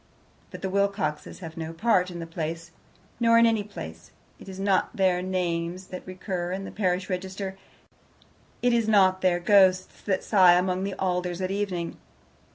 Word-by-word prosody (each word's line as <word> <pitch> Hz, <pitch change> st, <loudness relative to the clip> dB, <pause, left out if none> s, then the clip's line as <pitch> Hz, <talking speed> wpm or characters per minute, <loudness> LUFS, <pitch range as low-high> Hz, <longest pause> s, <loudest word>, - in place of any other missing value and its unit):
But -, -, -10 dB
the 190 Hz, -, -1 dB
Wilcoxes 200 Hz, -6 st, -1 dB
have 165 Hz, -2 st, -8 dB
no 160 Hz, 0 st, -5 dB
part 185 Hz, 0 st, +2 dB
in 175 Hz, -, -7 dB
the 165 Hz, -, -5 dB
place, 165 Hz, +1 st, -5 dB, 0.5 s
nor 230 Hz, -1 st, +5 dB
in 230 Hz, -, +6 dB
any 225 Hz, -2 st, +2 dB
place. 80 Hz, -, -9 dB, 0.3 s
It -, -, -11 dB
is 190 Hz, 0 st, -8 dB
not 195 Hz, -1 st, +1 dB
their 185 Hz, -2 st, +2 dB
names 180 Hz, -1 st, -2 dB
that 185 Hz, -, -8 dB
recur 185 Hz, -1 st, -4 dB
in 190 Hz, +1 st, -3 dB
the -, -, -7 dB
parish 185 Hz, -2 st, -1 dB
register. 190 Hz, +1 st, -4 dB, 1.1 s
It 245 Hz, -1 st, +3 dB
is 230 Hz, -2 st, +2 dB
not 190 Hz, -3 st, +4 dB
their 180 Hz, -2 st, +2 dB
ghosts 185 Hz, 0 st, +3 dB
that 190 Hz, -2 st, -1 dB
sigh 185 Hz, -4 st, +6 dB
among 185 Hz, +1 st, +1 dB
the 195 Hz, -, -4 dB
alders 180 Hz, -1 st, -1 dB
at 185 Hz, 0 st, -2 dB
evening. 195 Hz, -4 st, -3 dB
185 Hz, 170 wpm, -26 LUFS, 175-195 Hz, 1.1 s, in